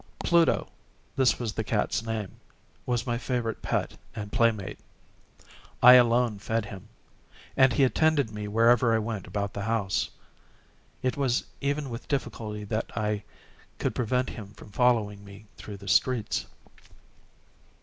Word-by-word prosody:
Pluto—this 135 -6 +1
was 115 -4 -3
the - - -2
cat's - - 0
name—was 115 +2 -5
my 120 -2 -1
favorite 120 -4 -2
pet - - -2 0.2
and 105 -1 -6
playmate. 110 -5 +1 1.0
I 125 +1 +11
alone 120 -3 +4
fed 110 +1 -1
him, 100 -3 -10 0.7
and 130 -1 +5
he 140 - +3
attended 145 -2 +2
me 105 -1 -5
wherever 115 +2 +4
I - - +3
went 110 -3 -4
about 100 +1 -3
the 100 - -4
house. 105 -2 0 0.9
It 130 +1 0
was 135 -3 +1 0.2
even 140 -1 -1
with 115 +1 -7
difficulty 110 -6 -3
that 110 +2 -3
I 105 -1 0 0.6
could - - -1
prevent 125 +1 0
him 105 -3 -9
from - - -14
following 105 -3 +1
me 100 +1 -13
through 105 -2 -9
the 100 0 -12
streets. 125 -2 +1
115 Hz, 135 wpm, -27 LUFS, 105-125 Hz, 1.0 s, I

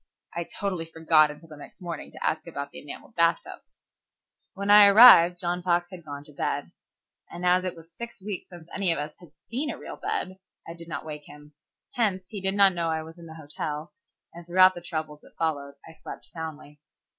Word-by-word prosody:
I 170 0 -2
totally 185 -4 -4
forgot 160 -1 +3
until 150 +2 -11
the 155 - -10
next 145 - -13
morning 175 -3 -7
to - - -6
ask 160 - -1
about 140 -4 -6
the - - -9
enamelled 145 +9 -10
bathtubs. 170 0 -1 0.8
When 200 +1 0
I 205 0 +10
arrived 200 -5 +9
John 175 +1 -2
Fox 175 0 0
had 180 -2 -10
gone 145 -2 -8
to 150 0 -15
bed, - - -3 0.6
and 175 +1 -6
as 180 +1 +4
it 185 - -3
was 165 0 -16
six 235 -1 -7
weeks 195 -1 -6
since 175 -3 -12
any 190 -3 +2
of 165 - +1
us 150 +1 -5
had 175 -4 -16 0.2
seen 275 +6 -1
a - - -4
real - - -9
bed, 185 +1 -3 0.3
I 165 - -6
did 170 0 -12
not 160 - -6
wake 150 -1 -7
him. 150 0 -14 0.4
Hence, 195 -6 0
he 205 -4 -6
did 190 +1 +1
not 200 -2 +6
know 170 -2 -1
I 160 -1 -1
was 165 +2 -13
in 170 - -11
the 160 - -11
hotel, 150 +1 -6 0.4
and 170 +1 -10
throughout 185 +2 +5
the 175 - -9
troubles 155 -3 -5
that - - -21
followed 145 -3 -2
I 160 - -12
slept 155 - -10
soundly. 155 -3 -9
170 Hz, 215 wpm, -26 LUFS, 155-185 Hz, 0.8 s, I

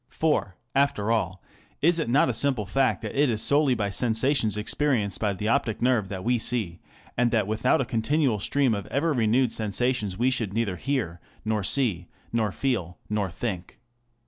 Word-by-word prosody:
For, 150 - -1 0.2
after 135 -6 +1
all, 95 -5 -1 0.4
is 170 +2 +3
it 155 - -2
not 135 +4 +4
a 125 - 0
simple 125 -2 +1
fact 135 +5 0
that - - -5
it 145 0 +2
is 110 -2 +1
solely 140 -2 +3
by 100 -3 -2
sensations 115 +1 +1
experienced 110 -2 0
by 105 -2 0
the 105 +3 -4
optic 115 -2 0
nerve 120 -6 +1
that 95 -2 -6
we 120 0 +1
see, 110 -8 0 0.4
and 120 0 +2
that 110 -3 +1
without 110 +4 +1
a - - -1
continual 130 0 0
stream 135 +3 +1
of 100 -2 -4
ever 150 +4 0
renewed 120 0 +2
sensations 110 -2 0
we 125 +3 +2
should 110 -6 -2
neither 105 -5 -1
hear, 115 -12 -2 0.3
nor 110 -2 -1
see, 95 -6 +1 0.3
nor 110 -3 0
feel, 95 -9 -2
nor 105 -3 -1
think. 95 -1 -6
115 Hz, 180 wpm, -25 LUFS, 105-130 Hz, 0.4 s, not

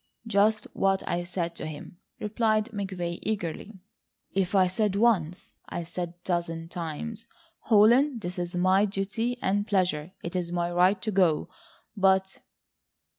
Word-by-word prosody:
"Just 215 0 +3
what 195 0 +1
I 175 0 -1
said 175 -1 -3
to - - -5
him," 155 +3 -9 0.2
replied 215 +1 +1
McVay 185 -4 -3
eagerly. 200 0 -4 0.5
"If 195 0 0
I 190 -1 +6
said 195 +2 0
once, 195 -6 +1 0.2
I 175 - -3
said 175 +1 -4
a 175 +1 -23
dozen 165 -2 -2
times: 185 +7 -5 0.3
'Holland, 235 +3 +4
it 180 0 -4
is 175 +1 -3
my 185 +3 +4
duty 210 +5 -2
and 205 +2 +1
pleasure, 185 -5 0
it 170 - -5
is 175 -1 -2
my 175 0 -1
right 180 +3 +3
to 215 - -1
go,' 180 -6 +3 0.5
but 190 -1 +2
190 Hz, 145 wpm, -27 LUFS, 175-210 Hz, 0.5 s, I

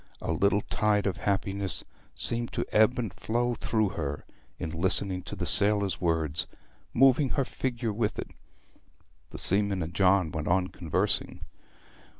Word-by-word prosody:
A - - -3
little 100 +1 +2
tide 105 -1 0
of 100 - -1
happiness 100 -1 -1 0.3
seemed 120 0 -2
to - - -2
ebb 110 +3 +4
and 115 -5 -3
flow 120 +2 -1
through 110 -3 0
her 75 -7 -5 0.3
in 80 -3 -5
listening 95 +2 +2
to 90 - -7
the - - -3
sailor's 100 -2 +3
words, 80 -3 -1 0.4
moving 135 +2 +4
her 135 0 0
figure 120 -4 -3
with 105 0 -1
it. - - -7 0.9
The - - -9
seaman 100 -1 +3
and 80 +2 -6
John 95 -3 +3
went 80 -1 -4
on 90 +1 +1
conversing. 85 -4 -2
100 Hz, 150 wpm, -28 LUFS, 90-110 Hz, 0.9 s, ebb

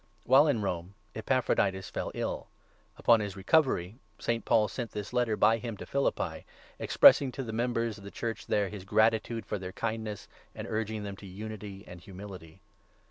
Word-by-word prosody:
While 135 +5 +6
in 120 -8 +1
Rome, 90 0 -3 0.2
Epaphroditus 105 -5 0
fell - - -3
ill; - - -3 0.5
upon 115 -1 +5
his 100 -2 -4
recovery 105 - +2 0.2
St. 115 -2 -1
Paul 105 -1 +3
sent 120 +3 -5
this 105 +2 -5
Letter 120 -3 +1
by 115 +1 +4
him 115 -2 -5
to - - -8
Philippi, 140 0 -1 0.4
expressing 135 -3 +6
to 135 - -4
the 110 -3 -6
members 115 -2 -1
of - - -14
the 100 - -7
Church 115 +2 -5
there 100 -2 +1
his 105 -3 -8
gratitude 110 +3 +2
for 105 - -3
their 90 0 -6
kindness, 110 -2 -4 0.3
and - - -5
urging 110 -1 -2
them 100 -1 -6
to 100 - -11
unity 100 0 -7
and 90 -1 -11
humility. 90 -4 -10
110 Hz, 175 wpm, -30 LUFS, 100-115 Hz, 0.5 s, While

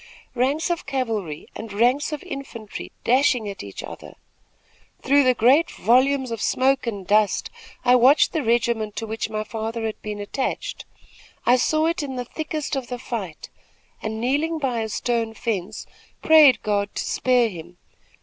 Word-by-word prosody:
Ranks 275 +7 0
of 340 - -3
cavalry 225 - -3
and 220 -1 -7
ranks 245 +9 +2
of 300 - -5
infantry 230 -6 -7
dashing 255 -3 +3
at 200 -1 -6
each 100 -1 -8
other. - - -10 0.9
Through 280 +2 +5
the 255 -1 +3
great 270 +9 +4
volumes 260 +3 +2
of 230 -2 -4
smoke 265 -1 +1
and 200 -5 -4
dust, 210 +1 +2 0.3
I 250 0 +6
watched 260 +5 +5
the 320 - 0
regiment 230 -3 0
to 225 - -3
which 220 +1 -3
my 215 0 -3
father 225 +1 -4
had 220 - -4
been 210 -1 -5
attached. 205 +6 -4 0.6
I 245 - +6
saw 310 +5 +2
it 335 0 0
in 275 -3 -5
the 250 -1 -4
thickest 305 +2 -4
of 265 -3 -3
the 250 - -4
fight 205 -9 -6 0.5
and, 220 0 -4
kneeling 290 +7 0
by 260 -6 -1
a 220 -1 -3
stone 230 0 -1
fence, 210 -2 -3 0.4
prayed 305 -5 +7
God 205 -1 -1
to - - -2
spare 250 -2 +2
him. 175 -1 -10
240 Hz, 165 wpm, -23 LUFS, 215-270 Hz, 0.9 s, prayed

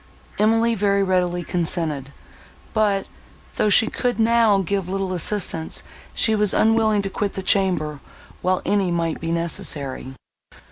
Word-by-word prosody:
Emily 225 +2 +3
very 200 -2 +1
readily 180 -2 0
consented, 160 -5 -2 0.6
but, 205 -3 +1 0.5
though 215 - +2
she 220 +2 +5
could 245 +1 -2
now 225 -3 +4
give 195 -1 -2
little 195 -1 -2
assistance, 175 -3 -1 0.3
she 220 - +4
was 210 -2 +1
unwilling 220 -2 +3
to 195 - -3
quit 200 0 -2
the 190 - -5
chamber, 180 -7 +1 0.4
while 185 0 0
any 200 -3 +1
might 170 -2 -2
be 165 0 -3
necessary. 145 -5 -2
195 Hz, 135 wpm, -22 LUFS, 170-210 Hz, 0.6 s, she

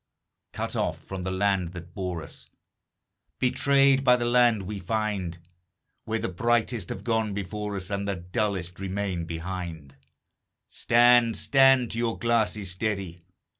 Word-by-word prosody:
Cut - - -4
off - - -2
from 95 -1 -6
the 95 - -3
land 95 -2 0
that 90 -1 -10
bore 90 -5 -4
us, - - -11 0.9
Betrayed 135 +1 +3
by 125 -2 +6
the 120 -1 -1
land 120 -3 +3
we 100 +2 -5
find, 100 -3 -2 0.7
Where 115 0 -1
the 115 +1 -2
brightest 115 +1 0
have 95 - -6
gone 110 -3 0
before 100 +1 -4
us, 95 0 -5
And 100 0 -2
the 100 - -1
dullest 90 0 -3
remain 95 -2 -3
behind 85 -4 -6 0.7
Stand, 120 -1 +4
stand 135 -3 +4
to 115 - -2
your 115 -1 -1
glasses, 110 -4 0
steady! 95 -3 -3
100 Hz, 140 wpm, -26 LUFS, 90-115 Hz, 0.9 s, by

